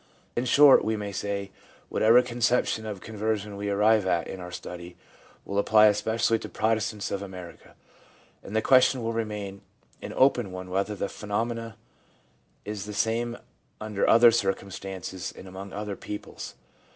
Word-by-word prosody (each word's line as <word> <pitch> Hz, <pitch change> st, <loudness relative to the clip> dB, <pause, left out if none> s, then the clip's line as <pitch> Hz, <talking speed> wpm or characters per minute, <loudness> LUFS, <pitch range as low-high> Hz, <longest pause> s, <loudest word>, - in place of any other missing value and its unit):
In 120 Hz, -, 0 dB
short, 140 Hz, +2 st, +7 dB
we 110 Hz, -, 0 dB
may 105 Hz, -1 st, -4 dB
say, 100 Hz, 0 st, -3 dB, 0.4 s
whatever 115 Hz, +3 st, +5 dB
conception 120 Hz, -2 st, 0 dB
of 100 Hz, -3 st, -6 dB
conversion 105 Hz, -1 st, -3 dB
we 100 Hz, 0 st, -3 dB
arrive 105 Hz, 0 st, +3 dB
at 85 Hz, -2 st, +1 dB
in 95 Hz, -, -7 dB
our 90 Hz, 0 st, -8 dB
study 90 Hz, 0 st, -8 dB, 0.5 s
will 100 Hz, 0 st, -1 dB
apply 105 Hz, +1 st, +5 dB
especially 110 Hz, +2 st, +2 dB
to -, -, -8 dB
Protestants 110 Hz, -1 st, -1 dB
of 100 Hz, -, -2 dB
America, 90 Hz, -3 st, -10 dB, 0.7 s
and 105 Hz, -, -8 dB
the 110 Hz, -, +2 dB
question 130 Hz, -1 st, +4 dB
will 115 Hz, 0 st, -1 dB
remain 105 Hz, -3 st, -4 dB, 0.4 s
an -, -, -6 dB
open 125 Hz, -6 st, +3 dB
one 90 Hz, 0 st, -7 dB
whether 100 Hz, +3 st, -1 dB
the 100 Hz, -, -2 dB
phenomenon 115 Hz, +2 st, -3 dB, 0.9 s
is 105 Hz, -1 st, -5 dB
the 105 Hz, 0 st, -7 dB
same 115 Hz, +2 st, 0 dB, 0.4 s
under 105 Hz, -2 st, -1 dB
other 115 Hz, +1 st, +8 dB
circumstances 95 Hz, -3 st, -3 dB
and 95 Hz, -, -10 dB
among 95 Hz, +1 st, -8 dB
other 105 Hz, 0 st, -4 dB
peoples. 105 Hz, +1 st, -8 dB
105 Hz, 150 wpm, -27 LUFS, 100-115 Hz, 0.9 s, other